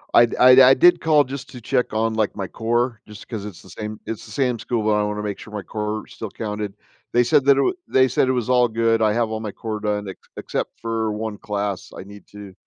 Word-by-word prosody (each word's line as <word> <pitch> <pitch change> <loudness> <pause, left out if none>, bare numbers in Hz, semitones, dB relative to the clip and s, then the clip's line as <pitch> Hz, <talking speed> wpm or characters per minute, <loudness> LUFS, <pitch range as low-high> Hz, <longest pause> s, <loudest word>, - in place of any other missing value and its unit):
I 120 - +8
d - - -6 0.2
I 130 +1 +8
did 175 +4 +5
call 155 -2 +4
just 135 0 -8
to 125 - -10
check 125 +2 0
on, 110 +1 0
like, 110 -2 -1
my 95 -2 -4
core, 120 +2 -1
just 105 0 -12
'cause 110 -4 -6
it's 100 -6 -9
the - - -16
same 105 0 -7
it's 115 0 -6
the 105 - -13
same 125 -3 0
school, 115 -3 -2
but 110 - +2
I 105 0 +2
wanna 105 0 -3
make 105 -1 -4
sure 110 - -11
my 105 - -4
core 105 0 -4
still 110 - -8
counted. 105 -1 -5 0.4
They 120 - +4
said 130 +2 +3
that 140 - +7
it - - -2
w 140 - +2
they 130 0 +4
said 130 +1 +1
it - - +2
was 125 -3 -1
all 125 -1 +4
good, 115 0 +1
I 110 -1 +3
have 115 0 0
all 110 - -3
my 110 -2 -5
core 110 +1 -5
done, 105 -1 -2
ex 95 - -8 0.2
except - - -4
for 115 -1 -2
1 105 -1 -4
class 100 -3 -4
I - - -7
need 100 +1 -14
to 105 -2 -11
110 Hz, 260 wpm, -22 LUFS, 105-120 Hz, 0.4 s, I